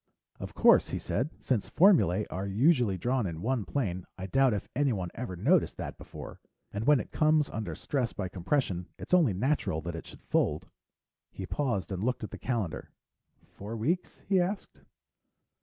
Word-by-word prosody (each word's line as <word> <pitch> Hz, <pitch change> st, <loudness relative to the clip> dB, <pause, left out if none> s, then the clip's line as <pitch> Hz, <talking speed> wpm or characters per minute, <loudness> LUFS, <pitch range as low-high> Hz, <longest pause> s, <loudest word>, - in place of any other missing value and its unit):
"Of -, -, -7 dB
course," -, -, +5 dB
he -, -, -2 dB
said. 130 Hz, +8 st, -1 dB
"Since 120 Hz, -6 st, -1 dB
formulae 155 Hz, -, +4 dB
are 95 Hz, +2 st, -3 dB
usually 120 Hz, -, +3 dB
drawn 120 Hz, +2 st, 0 dB
in 80 Hz, -2 st, -5 dB
one 120 Hz, +2 st, -1 dB
plane, 95 Hz, -10 st, -2 dB
I 95 Hz, -, -5 dB
doubt 135 Hz, +7 st, +3 dB
if 100 Hz, -, -4 dB
anyone 115 Hz, -11 st, 0 dB
ever 115 Hz, -6 st, -5 dB
noticed 145 Hz, -, +2 dB
that -, -, -6 dB
before. -, -, -9 dB, 0.3 s
And 105 Hz, +3 st, -3 dB
when 150 Hz, -3 st, +6 dB
it -, -, -6 dB
comes 155 Hz, -1 st, +3 dB
under 110 Hz, -1 st, -4 dB
stress 130 Hz, -5 st, -1 dB
by 100 Hz, -, -4 dB
compression, 90 Hz, 0 st, -1 dB
it's -, -, -7 dB
only 165 Hz, -, +5 dB
natural 125 Hz, -, 0 dB
that 85 Hz, +1 st, -5 dB
it 80 Hz, -, -7 dB
should -, -, -13 dB
fold." -, -, 0 dB, 0.7 s
He -, -, -6 dB
paused 120 Hz, -10 st, -2 dB
and 95 Hz, +1 st, -3 dB
looked 125 Hz, -1 st, -1 dB
at 110 Hz, -, -5 dB
the -, -, -8 dB
calendar, 115 Hz, -9 st, -3 dB, 0.6 s
"Four 105 Hz, +3 st, -8 dB
weeks?" 165 Hz, +12 st, -2 dB
he 190 Hz, -2 st, +4 dB
asked. 195 Hz, +3 st, -4 dB
115 Hz, 175 wpm, -29 LUFS, 95-145 Hz, 0.7 s, when